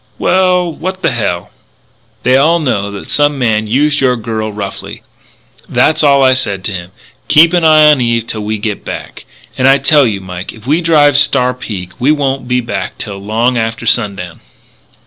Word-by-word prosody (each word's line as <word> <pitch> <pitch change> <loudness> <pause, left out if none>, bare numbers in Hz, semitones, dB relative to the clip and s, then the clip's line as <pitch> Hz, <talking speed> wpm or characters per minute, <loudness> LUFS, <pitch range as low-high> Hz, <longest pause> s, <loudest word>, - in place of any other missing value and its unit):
"Well, 180 -2 +1
what 185 +3 -6
the 165 - +2
hell 100 -7 -3 0.3
" - - -39
"They 125 +1 +3
all 155 +5 +3
know 120 -10 -1
that 100 -1 -9
some 145 -1 +2
man 110 -4 0
used 145 +6 +1
your 125 -2 +2
girl 110 -1 -4
roughly. 100 -2 -7 0.7
That's 155 0 +2
all 140 -2 +4
I 130 0 +5
said 100 -7 -2
to 100 - -3
him 90 -2 -7 0.4
'keep 165 +3 +5
an 175 -2 +2
eye 155 -1 +6
on 150 -3 +5
Eve 115 -1 0
until 110 -1 -6
we 105 +1 -3
can 105 - -9
get 105 -2 -3
back.' - - -8 0.3
And 130 - +3
I 135 +1 +6
tell 140 0 +3
you, 100 -3 -2
Mike, 90 -1 -8
if 110 -1 -16
we 155 +6 +1
drive 150 -4 +3
Star 135 -3 +2
Peak 100 -8 -7
we 130 +4 +2
won't 135 -4 -1
be 125 0 0
back 95 -5 -5
till 100 -2 -7
long 115 +5 0
after 115 +1 -3
sundown." 100 -7 -2
125 Hz, 195 wpm, -13 LUFS, 105-145 Hz, 0.7 s, eye